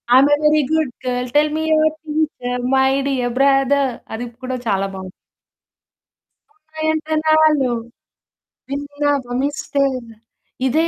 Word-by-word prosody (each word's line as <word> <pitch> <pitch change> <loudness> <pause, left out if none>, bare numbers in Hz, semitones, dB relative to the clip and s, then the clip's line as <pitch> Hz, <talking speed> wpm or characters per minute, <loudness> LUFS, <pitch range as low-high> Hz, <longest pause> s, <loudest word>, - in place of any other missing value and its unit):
I'm a 280 +3 +6
very 305 0 +4
good 315 -5 +1
girl 250 0 -2
tell 300 0 +4
me 315 - -1
your 310 0 +4
teacher 295 -5 -2
my 265 0 +4 0.2
dear 250 -3 -1
brother 275 0 +3 0.2
అది 230 +2 -4 0.2
కూడా 255 0 -3
చాలా 195 -2 +1
బావుంది. 190 -1 -7 1.4
ఉన్నాయంట 315 -3 -3 0.2
నాలో 310 -4 +4 1.0
విన్నావ 285 0 -1 0.2
మిస్టర్ 275 -2 -1 0.7
ఇదే 320 +6 +2
280 Hz, 110 wpm, -19 LUFS, 255-310 Hz, 1.4 s, I'm a